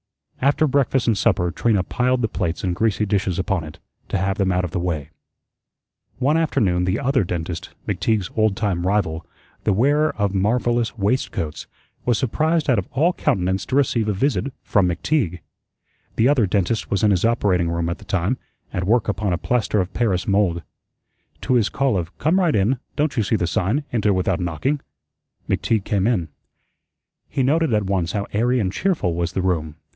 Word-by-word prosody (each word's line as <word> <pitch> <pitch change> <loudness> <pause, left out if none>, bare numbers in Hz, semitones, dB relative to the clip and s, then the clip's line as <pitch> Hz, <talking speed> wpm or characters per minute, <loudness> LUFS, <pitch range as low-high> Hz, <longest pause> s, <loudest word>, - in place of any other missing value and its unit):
After 140 +3 +3
breakfast 135 -3 +1
and 115 - +3
supper 90 -3 +1
Trina 105 -3 +1
piled 125 +5 0
the - - +3
plates 85 -6 -3
and 90 -2 0
greasy 105 +1 +1
dishes 95 -3 0
upon 95 -2 -1
it 75 -1 -10 0.3
to - - 0
have 95 +1 -1
them 95 -1 +2
out 90 0 +1
of 85 - -5
the - - -2
way. 80 -4 -3 1.1
One 135 +4 +2
afternoon 95 - +1
the 95 +3 +1
Other 135 -3 +2
Dentist, 85 0 -4 0.2
McTeague's 105 -1 0
old 110 -3 +2
time 90 -5 -1
rival, 90 -5 0 0.4
the 105 - +2
wearer 145 +8 +3
of 100 -2 0
marvellous 120 +4 +1
waistcoats, 100 -7 -2 0.4
was 120 -3 +2
surprised 155 +5 0
out 125 -6 +3
of 95 - -5
all 160 +7 +3
countenance 95 - 0
to 130 - -1
receive 120 -5 +2
a 105 - +1
visit 140 +6 0
from 100 -3 +2
McTeague. 90 - -1 0.7
The 115 - +3
Other 130 -7 +3
Dentist 100 +3 0
was 100 - 0
in 105 - +5
his 90 -3 +1
operating 95 -7 +2
room 85 0 -1
at 85 +2 -3
the 105 - -14
time, 100 +5 0 0.3
at 90 - -1
work 115 +2 +2
upon 100 -2 -1
a - - 0
plaster 115 +1 0
of 90 0 -2
paris 100 -7 0
mould. 95 -4 +1 0.8
To - - 0
his 115 -4 +3
call 135 -5 +1
of 85 -1 -4
"'Come 165 +6 +2
right 175 -5 +2
in. 110 +6 +2 0.2
Don't 150 -1 0
you 115 - +2
see 110 +2 +1
the 90 - 0
sign, 95 - 0
'Enter 105 -3 +2
without 95 -1 0
knocking'?" 90 - -1 0.7
McTeague 110 -4 0
came 100 0 0
in. 90 -10 0 1.0
He 135 - 0
noted 155 +2 +2
at 105 -1 0
once 95 -3 -1
how 100 -1 -1
airy 120 +4 +2
and 95 -4 -1
cheerful 165 - 0
was 85 +1 -2
the 95 - -1
room. 80 -5 -1
100 Hz, 190 wpm, -22 LUFS, 90-125 Hz, 1.1 s, in